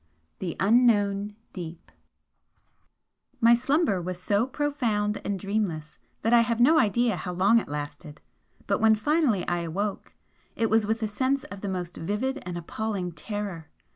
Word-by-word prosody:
XIX 80 0 -42
THE 180 -3 -3
UNKNOWN 205 -2 +3 0.2
DEEP 170 -2 -8 1.5
My 230 +1 +6
slumber 255 - +2
was 180 0 -5
so 205 +6 +1
profound 245 -8 -1
and 200 -1 -2
dreamless 190 -6 -3 0.2
that 225 - +2
I 235 - +7
have 230 0 0
no 315 +7 +6
idea 235 -1 +2
how 180 +3 -5
long 200 +6 +4
it - - -7
lasted, 150 +1 -6 0.5
but 200 - 0
when 220 0 +6
finally 265 - +1
I 175 0 0
awoke 190 +5 -3 0.4
it 225 -2 0
was 220 -1 +3
with 225 +1 -1
a - - +1
sense 260 +6 0
of 200 -1 -9
the 200 - -3
most 180 -2 -4
vivid 215 +11 -2
and 175 -1 -4
appalling 190 +1 -3
terror. 195 -4 -6
205 Hz, 160 wpm, -26 LUFS, 180-230 Hz, 1.5 s, I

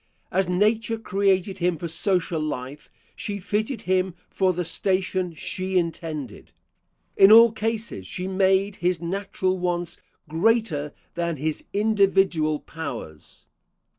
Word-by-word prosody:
As 190 -1 +1
Nature 220 +5 +1
created 195 -2 0
him 175 -1 +1
for 170 - -4
social 170 -1 0
life, 145 -1 -5 0.3
she 205 -1 -4
fitted 210 +5 -2
him 185 -1 0
for 190 -1 +1
the 180 0 -3
station 185 0 -1
she 185 +5 -2
intended. 160 - -4 0.7
In 195 +2 +7
all 230 +1 +9
cases 220 - -3
she 180 - -4
made 190 +1 +2
his 180 -1 0
natural 185 +1 -2
wants 175 -1 -2 0.3
greater 165 -3 +1 0.2
than 170 -2 -2
his 155 +2 -3
individual 195 -7 +2
powers. 120 - -8
185 Hz, 120 wpm, -24 LUFS, 165-200 Hz, 0.7 s, all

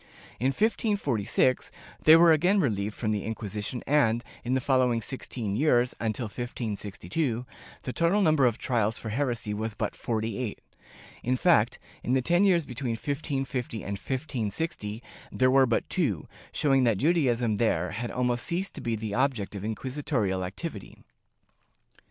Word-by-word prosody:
In 125 - +1
1546 140 - +1 0.3
they 155 - +8
were 165 0 +7
again 180 +6 +3
relieved 105 - 0
from 110 -3 -1
the 105 -2 -1
Inquisition 110 +1 -4
and, 120 -5 +3 0.2
in 125 +2 0
the - - +2
following 130 -3 +2
sixteen 115 -3 -4
years, 125 -2 +3
until 115 +2 -2
1562, 115 - -3 0.4
the 125 - -4
total 170 +5 +2
number 155 -6 +4
of 115 -1 0
trials 115 -4 0
for 110 - -5
heresy 120 -3 -1
was 110 +1 -3
but 105 0 -2
forty 110 -1 -2
eight 120 -5 -3 0.4
— - - -20
in 125 +1 +1
fact, 125 -8 +3 0.3
in 125 - 0
the 130 - +3
ten 175 +7 +3
years 175 -5 +3
between 125 -1 -3
1550 135 -2 -3
and 100 - -5
1560, 115 - -3 0.3
there 130 0 +3
were 135 0 +5
but 115 - 0
two, 125 - -1 0.2
showing 135 -3 +3
that 115 -5 +3
Judaism 125 - +2
there 90 -6 +1
had 115 +5 -4
almost 125 -1 0
ceased 185 +3 -1
to - - -7
be 115 -1 -1
the 110 -1 -4
object 125 -5 0
of 100 -1 -6
inquisitorial 110 -4 -1
activity. 100 - -6
120 Hz, 155 wpm, -28 LUFS, 110-140 Hz, 0.4 s, they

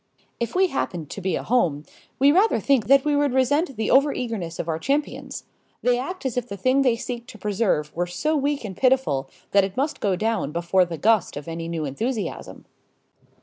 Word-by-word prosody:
If 235 +5 -3
we 380 +1 +5
happened 170 - -3
to 200 - -6
be 190 0 0
a - - -3
home, 170 -12 +1 0.3
we 275 +2 +5
rather 390 +8 +3
think 265 -7 +2
that 275 +2 +5
we 295 -1 +2
would 285 -2 +1
resent 275 +3 +2
the 220 - -1
overeagerness 230 - +1
of - - -3
our 160 -1 -1
champions. 285 - -2 0.4
They 245 0 +3
act 330 +5 -6
as 250 -2 -2
if 245 -1 -1
the 200 - -5
thing 255 +7 +2
they 250 -4 +3
seek 240 0 -6
to 220 - -11
preserve 195 -7 -1
were 175 +1 -1
so 300 - -1
weak 285 -3 -1
and 190 -3 -6
pitiful 255 - +1 0.2
that 200 -1 +5
it 195 +2 -4
must 290 +4 -1
go 195 -3 +1
down 215 -6 -1
before 175 +2 +2
the 170 -1 -6
gust 215 -4 +2
of 145 - -8
any 165 0 -5
new 165 -2 -3
enthusiasm. 220 - -4
230 Hz, 205 wpm, -24 LUFS, 175-270 Hz, 0.4 s, we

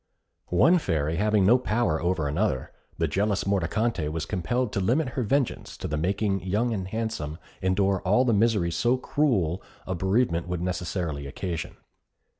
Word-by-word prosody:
One 165 - +4
Fairy 80 - -1
having 105 0 +3
no 120 +6 +6
power 110 -9 0
over 85 -4 0
another, 75 - -1 0.3
the - - +1
jealous 100 0 0
Mordicante 100 -1 0
was 80 0 -3
compelled 110 +6 -1
to - - 0
limit 125 +9 +1
her 130 - -3
vengeance 130 +3 -1
to - - -4
the 75 - -2
making 95 +5 0
Young 105 +6 0
and 95 -3 -3
Handsome 110 -8 -3 0.2
endure 95 0 +1
all 105 +8 +3
the 120 - +3
misery 105 -5 +2
so 120 +10 +2
cruel 105 - 0 0.2
a 95 - -2
bereavement 95 -1 +1
would 90 -1 -3
necessarily 85 -5 -3
occasion. 85 +4 -5
95 Hz, 160 wpm, -26 LUFS, 85-115 Hz, 0.3 s, no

